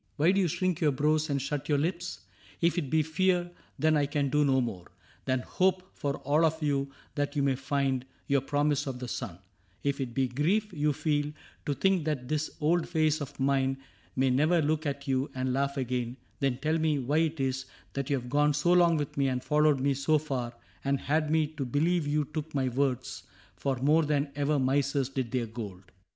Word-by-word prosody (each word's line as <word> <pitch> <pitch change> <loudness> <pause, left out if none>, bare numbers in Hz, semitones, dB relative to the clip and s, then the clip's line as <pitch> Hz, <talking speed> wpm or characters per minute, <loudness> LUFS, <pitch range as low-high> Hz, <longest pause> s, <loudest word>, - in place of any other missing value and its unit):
Why 155 +4 +4
do 195 +1 +2
you 180 - +2
shrink 180 +1 -1
your 150 -3 +4
brows 155 +3 +1
and 140 -1 +1
shut 140 +2 -3
your 145 - +3
lips? 175 +4 -2 0.4
If 170 0 +2
it 145 -6 -4
be 155 +1 +3
fear, 175 +2 +1 0.3
then 155 0 +3
I 145 -1 +2
can 145 -1 0
do 150 +1 +3
no 135 -2 +3
more 110 -8 -3 0.4
Than 130 -1 +1
hope 185 +5 0
for 140 -1 -2
all 150 +4 +3
of 160 0 +2
you 140 -2 0 0.2
that 145 0 -2
you 140 - +1
may 135 -1 +3
find 135 -1 0 0.2
Your 140 -1 +2
promise 145 +1 0
of 130 -2 -3
the 125 0 -6
sun; 90 -6 -5 0.5
if 140 0 0
it 120 -3 -4
be 135 -1 +2
grief 185 - 0
You 150 -2 +1
feel, 145 0 0 0.4
to 145 - +1
think 190 -3 +2
that 140 -5 -2
this 155 +2 -1
old 165 +3 +1
face 155 -2 +2
of 145 0 -7
mine 135 0 +2 0.4
May 130 0 +2
never 155 +7 +3
look 155 0 0
at 140 0 -4
you 135 +1 +1
and 130 0 -1
laugh 140 +1 0
again, 125 -1 -2 0.2
Then 135 -3 +1
tell 155 +4 0
me 155 -2 +2
why 140 +3 0
it 160 -1 0
is 130 0 -1 0.3
that 140 -1 -3
you 140 - +3
have 125 - -10
gone 145 +3 +2
So 170 +4 +3
long 170 -2 +5
with 145 -2 -4
me, 140 -1 +3
and 130 -1 -1
followed 150 -2 +3
me 140 +1 +2
so 140 +3 +2
far, 130 -6 -3 0.3
And 140 0 +1
had 155 +3 0
me 160 0 +3
to 150 -2 -5
believe 150 +5 +1
you 150 0 +1
took 155 +1 -6
my 130 -2 +1
words 130 0 -1 0.3
For 135 -1 -1
more 150 +6 +3
than 145 -1 0
ever 145 +1 +1
misers 135 0 +1
did 130 -3 -2
their 125 -1 -1
gold 100 -5 -8
145 Hz, 215 wpm, -29 LUFS, 135-155 Hz, 0.5 s, long